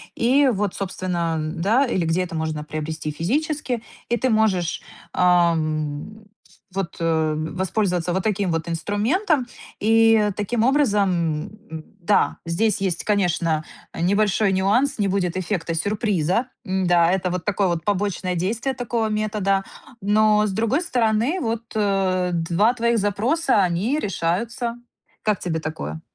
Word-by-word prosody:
и 265 +4 +3
вот, 200 -1 -1
собственно, 180 -3 -2
м, 155 +2 -4
да, 230 +9 +3
или 185 -8 0
где 170 +3 +1
это 170 - -7
можно 155 -1 -2
приобрести 155 0 -4
физически. 255 - -2 0.3
И 240 - +2
ты 260 - 0
можешь, 205 -6 +1 0.3
ам, 170 +1 +1 0.5
в - - -19
вот, 190 -3 -3
э, 160 -2 +1
воспользоваться 180 +1 -1
вот 190 - -1
таким 200 -3 0
вот 165 +1 -2
инструментом. 240 - 0 0.4
И 225 -1 +4
таким 220 +3 0
образом, 235 -8 +3 0.6
м 160 -1 -7 0.2
Да, 205 +4 +2
здесь 195 +5 +1
есть, 180 -4 -1
конечно, 175 -6 +1 0.3
э, - - -5
небольшой 200 +2 +2
нюанс- 205 +9 +2
не 200 - +2
будет 185 -3 0
эффекта 175 -2 -2
сюрприза. 205 - 0 0.2
М, 185 -1 0
да, 175 -1 +4
это 190 -1 0
вот 180 -2 -3
такое 200 -1 +1
вот 170 -2 -1
побочное 195 -2 -1
действие 225 +10 -1
такого 235 -2 -1
метода. 210 -2 0 0.4
Но, 210 +1 +3
с 200 - -2
другой 230 - +1
стороны, 245 +3 +1
вот, 230 -2 -2
э, 190 -3 +1
2 170 +7 +2
твоих 235 -1 +1
запроса- 220 - +1
они 195 - 0
решаются. 225 - -2 0.5
Как 210 -3 +1
тебе 160 -2 -2
такое? 80 - -5
195 Hz, 140 wpm, -22 LUFS, 170-220 Hz, 0.6 s, И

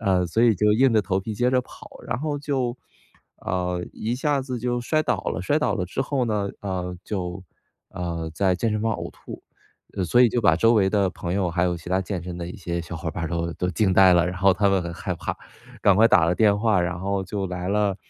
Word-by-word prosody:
啊， 90 -3 +2
所 110 +7 0
以 115 -2 +5
就 105 +2 +3
硬 125 +2 +4
着 110 - +4
头 95 -2 -1
皮 105 +2 -5
接 125 +4 +1
着 130 - +4
跑， - - -14 0.2
然 105 - -2
后 145 0 -2
就 130 -4 -2 0.7
呃， 90 -1 -1
一 115 +3 -2
下 140 +1 0
子 130 -2 -4
就 120 +1 -1
摔 155 +5 +1
倒 - - 0
了， - - -2
摔 145 +10 +1
倒 125 -9 0
了 90 -4 -2
之 125 +9 -2
后 135 -2 -1
呢， 105 -2 -1
呃， 90 -2 -4
就， 90 -2 -4 0.5
呃， 85 -2 -4
在 95 +1 +2
健 110 +5 -1
身 105 0 -1
房 115 0 +1
呕 - - -5
吐。 - - -11 0.6
所 120 +8 +4
以 120 - +6
就 120 - 0
把 85 -7 +4
周 115 +7 +4
围 95 -3 +3
的 100 -2 +1
朋 85 -2 -5
友 95 -3 0
还 85 +1 +1
有 90 -1 0
其 85 +1 -10
他 95 - +2
健 95 -2 -4
身 90 0 -6
的 85 - -5
一 90 - -8
些 85 -2 -3
小 85 0 -7
伙 80 +1 -4
伴 85 - -4
儿 - - -3
都 85 0 -2
都 90 - -2
惊 95 +1 +1
呆 95 -1 +6
了。 85 0 +4
然 90 0 -3
后 95 0 +4
他 100 +1 +2
们 95 -1 +2
很 85 -1 -5
害 95 0 -4
怕， 85 - -4 0.5
赶 100 -2 +5
快 110 +2 +6
打 95 -9 +4
了 85 - +2
电 100 +1 +4
话。 105 -3 +2
然 90 0 -2
后 100 0 -1
就 100 +1 -3
来 90 0 -4
了 100 -1 +1
95 Hz, 270 characters per minute, -24 LUFS, 90-115 Hz, 0.7 s, 以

